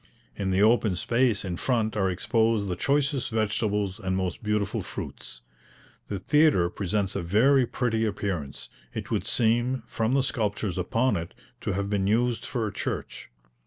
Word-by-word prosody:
In 95 Hz, -1 st, -2 dB
the 95 Hz, +2 st, +3 dB
open 110 Hz, -3 st, +4 dB
space 115 Hz, +2 st, +1 dB
in 90 Hz, -2 st, -3 dB
front 115 Hz, -2 st, 0 dB
are 95 Hz, -3 st, +1 dB
exposed 110 Hz, +3 st, +1 dB
the 90 Hz, -, -1 dB
choicest 140 Hz, -, 0 dB
vegetables 105 Hz, -3 st, 0 dB
and 95 Hz, -2 st, -1 dB
most 95 Hz, -2 st, -2 dB
beautiful 105 Hz, -2 st, -1 dB
fruits. -, -, -7 dB, 0.7 s
The 100 Hz, -, -3 dB
theatre 120 Hz, -, +3 dB
presents 100 Hz, +1 st, -1 dB
a -, -, -1 dB
very 120 Hz, +9 st, +4 dB
pretty 115 Hz, -3 st, 0 dB
appearance; 100 Hz, -9 st, -4 dB, 0.3 s
it -, -, -5 dB
would -, -, 0 dB
seem, 120 Hz, +2 st, +2 dB
from 115 Hz, +2 st, -1 dB
the 135 Hz, -, +3 dB
sculptures 105 Hz, -7 st, -1 dB
upon 115 Hz, +5 st, +1 dB
it, 85 Hz, 0 st, -6 dB, 0.2 s
to 100 Hz, -, -2 dB
have 100 Hz, +1 st, -1 dB
been 100 Hz, -1 st, 0 dB
used 120 Hz, +3 st, +1 dB
for 120 Hz, -4 st, -2 dB
a 100 Hz, -, -4 dB
church. -, -, -5 dB
105 Hz, 160 wpm, -26 LUFS, 95-120 Hz, 0.7 s, open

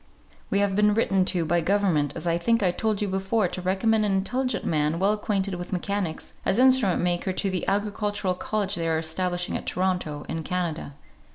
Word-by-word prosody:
"We -, -, +1 dB
have 200 Hz, -1 st, +1 dB
been 210 Hz, 0 st, +3 dB
written 195 Hz, -4 st, +2 dB
to 180 Hz, -3 st, +1 dB
by 170 Hz, +2 st, +2 dB
government, 170 Hz, -6 st, +1 dB
as -, -, -5 dB
I 170 Hz, 0 st, +1 dB
think 230 Hz, +4 st, +2 dB
I 180 Hz, -, +3 dB
told 215 Hz, +3 st, -1 dB
you -, -, -1 dB
before, 195 Hz, +2 st, 0 dB
to 180 Hz, -, -5 dB
recommend 215 Hz, +4 st, +2 dB
an 205 Hz, -2 st, +1 dB
intelligent 250 Hz, +7 st, -1 dB
man, 155 Hz, 0 st, +1 dB
well 195 Hz, +4 st, +2 dB
acquainted 200 Hz, -2 st, -1 dB
with 175 Hz, 0 st, -6 dB
mechanics, 185 Hz, -2 st, -3 dB
as 190 Hz, -, +1 dB
instrument 255 Hz, -8 st, +4 dB
maker 175 Hz, +2 st, 0 dB
to 190 Hz, +1 st, -1 dB
the 185 Hz, -, -3 dB
Agricultural 205 Hz, -1 st, -1 dB
College 200 Hz, +2 st, -2 dB
they 165 Hz, -3 st, -1 dB
are 160 Hz, -, +1 dB
establishing 175 Hz, +2 st, -2 dB
at -, -, -5 dB
Toronto, 180 Hz, -5 st, -1 dB
in 165 Hz, -, -3 dB
Canada. 165 Hz, -4 st, -3 dB
190 Hz, 195 wpm, -25 LUFS, 175-205 Hz, -, instrument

